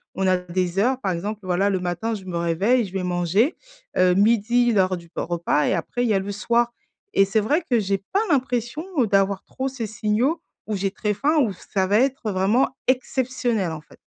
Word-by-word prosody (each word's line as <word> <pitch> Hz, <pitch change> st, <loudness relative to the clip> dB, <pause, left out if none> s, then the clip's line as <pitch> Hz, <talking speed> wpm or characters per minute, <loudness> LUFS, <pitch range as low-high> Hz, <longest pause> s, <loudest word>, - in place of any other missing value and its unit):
On 190 Hz, 0 st, 0 dB
a 185 Hz, -, +4 dB
des 180 Hz, +1 st, -2 dB
heures, 255 Hz, +4 st, +2 dB
par 195 Hz, -7 st, -1 dB
exemple, 205 Hz, +5 st, -4 dB
voilà, 185 Hz, +2 st, +1 dB
le 190 Hz, -2 st, 0 dB
matin 180 Hz, +6 st, -2 dB
je 200 Hz, -3 st, -6 dB
me 180 Hz, -2 st, -5 dB
réveille, 195 Hz, +9 st, +2 dB
je 185 Hz, -, -10 dB
vais 190 Hz, -1 st, -3 dB
manger, 180 Hz, -, +1 dB, 0.4 s
heu, 180 Hz, -1 st, +4 dB
midi, 235 Hz, +3 st, +3 dB
l'heure 185 Hz, -2 st, +2 dB
du 170 Hz, -1 st, -14 dB
repas 170 Hz, -3 st, 0 dB
et -, -, +2 dB
après 245 Hz, -, -2 dB
il 235 Hz, -, +1 dB
y -, -, +3 dB
a 195 Hz, -, +3 dB
le 200 Hz, +1 st, -4 dB
soir 235 Hz, +3 st, +1 dB, 0.4 s
et 195 Hz, -, +5 dB
c'est 195 Hz, +3 st, +1 dB
vrai 290 Hz, -, +1 dB
que 245 Hz, -7 st, +1 dB
j'ai 195 Hz, -1 st, 0 dB
pas 380 Hz, -, -2 dB
l'impression, 255 Hz, +1 st, 0 dB, 0.2 s
heu, 235 Hz, -, +3 dB
d'avoir 195 Hz, -1 st, +1 dB
trop 265 Hz, 0 st, -3 dB
ces 240 Hz, -4 st, -5 dB
signaux 235 Hz, +9 st, 0 dB, 0.3 s
où 215 Hz, -, -1 dB
j'ai 195 Hz, 0 st, -1 dB
très 210 Hz, +1 st, -1 dB
faim 295 Hz, +10 st, +1 dB
ou 225 Hz, -9 st, +2 dB
ça 190 Hz, +1 st, -2 dB
va 205 Hz, +3 st, +3 dB
être 260 Hz, -4 st, 0 dB
vraiment 195 Hz, +8 st, +2 dB, 0.2 s
exceptionnel, 250 Hz, -6 st, 0 dB
en 160 Hz, -, -5 dB
fait. 150 Hz, -, -19 dB
205 Hz, 215 wpm, -23 LUFS, 185-240 Hz, 0.4 s, et